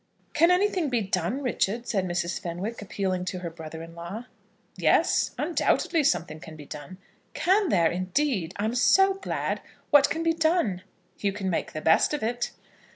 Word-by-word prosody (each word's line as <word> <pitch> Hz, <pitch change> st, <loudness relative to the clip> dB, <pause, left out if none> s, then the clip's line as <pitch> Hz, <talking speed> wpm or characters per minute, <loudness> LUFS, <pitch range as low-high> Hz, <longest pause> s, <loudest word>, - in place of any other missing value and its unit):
"Can 330 Hz, +3 st, +5 dB
anything 360 Hz, -3 st, +2 dB
be 245 Hz, -3 st, +1 dB
done, 190 Hz, +8 st, -1 dB
Richard?" 235 Hz, -2 st, -1 dB
said 195 Hz, -4 st, 0 dB
Mrs. 175 Hz, 0 st, -2 dB
Fenwick, 180 Hz, +7 st, -5 dB
appealing 190 Hz, -2 st, -2 dB
to 185 Hz, -, -3 dB
her 170 Hz, -2 st, -5 dB
brother 160 Hz, 0 st, -8 dB
in 165 Hz, 0 st, -11 dB
law. 170 Hz, +8 st, -7 dB, 0.5 s
"Yes; -, -, +3 dB
undoubtedly 330 Hz, 0 st, +1 dB
something 165 Hz, -, 0 dB
can 160 Hz, 0 st, -10 dB
be 150 Hz, -2 st, -11 dB
done." 150 Hz, +5 st, -9 dB, 0.4 s
"Can 385 Hz, +1 st, +2 dB
there, 170 Hz, -, +3 dB
indeed? 185 Hz, -, -1 dB
I 205 Hz, -, -1 dB
am 220 Hz, -, -1 dB
so 385 Hz, +10 st, +5 dB
glad. 390 Hz, 0 st, -3 dB, 0.3 s
What 290 Hz, -1 st, +6 dB
can 325 Hz, +1 st, -2 dB
be 330 Hz, 0 st, +3 dB
done?" 320 Hz, -, +1 dB, 0.4 s
"You 200 Hz, -, 0 dB
can 195 Hz, -1 st, -3 dB
make 165 Hz, -, -2 dB
the 155 Hz, -, -4 dB
best 160 Hz, -, +4 dB
of 295 Hz, -, -5 dB
it." 240 Hz, +2 st, -1 dB
205 Hz, 175 wpm, -26 LUFS, -, 0.5 s, What